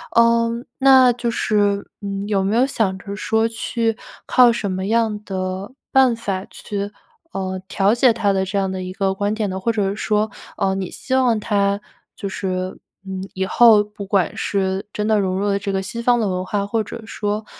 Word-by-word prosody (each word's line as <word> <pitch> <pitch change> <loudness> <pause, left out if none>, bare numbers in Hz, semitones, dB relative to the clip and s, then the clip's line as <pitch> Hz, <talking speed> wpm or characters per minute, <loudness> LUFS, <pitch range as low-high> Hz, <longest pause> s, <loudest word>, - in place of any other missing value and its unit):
嗯， 235 +1 +3
那 265 -2 +7
就 240 0 -2
是， 205 -3 +1
嗯， 200 0 -4
有 200 -2 +1
没 195 +3 0
有 250 - +4
想 220 -8 0
着 200 +1 -8
说 220 +1 +1
去 225 0 -1 0.3
靠 250 -1 +6
什 220 -4 -2
么 190 0 -2
样 220 -1 +1
的 190 +3 -4 0.2
办 260 -3 +5
法 195 -4 -3
去， 200 -1 -5 0.4
呃， 185 -1 -3
调 200 +2 +2
解 240 0 +4
他 215 -3 +1
的 190 0 +1
这 195 +2 -3
样 195 -1 0
的 185 0 -4
一 185 0 -5
个 195 -1 0
观 205 +2 -1
点 215 -2 -1
呢？ 190 - -3
或 230 +5 0
者 205 -3 0
是 200 - -3
说， 215 -1 0 0.2
呃， 190 - 0
你 190 -2 -3
希 - - -5
望 250 -4 +3
他 200 -1 +1 0.3
就 200 - -5
是， 185 -1 -3 0.3
嗯， 190 -1 -5
以 190 0 -1
后 220 +1 +6
不 210 -1 -9
管 190 -3 0
是 195 0 -1
真 210 - -2
的 215 -1 +3
融 190 -1 0
入 200 - -1
了 200 - +1
这 200 0 -3
个 190 - 0
西 230 +4 -5
方 245 +1 +3
的 220 -4 0
文 185 0 -2
化， 200 +1 -1
或 220 +2 0
者 230 +3 -7
说， 210 0 -3
205 Hz, 220 characters per minute, -21 LUFS, 190-225 Hz, 0.4 s, 那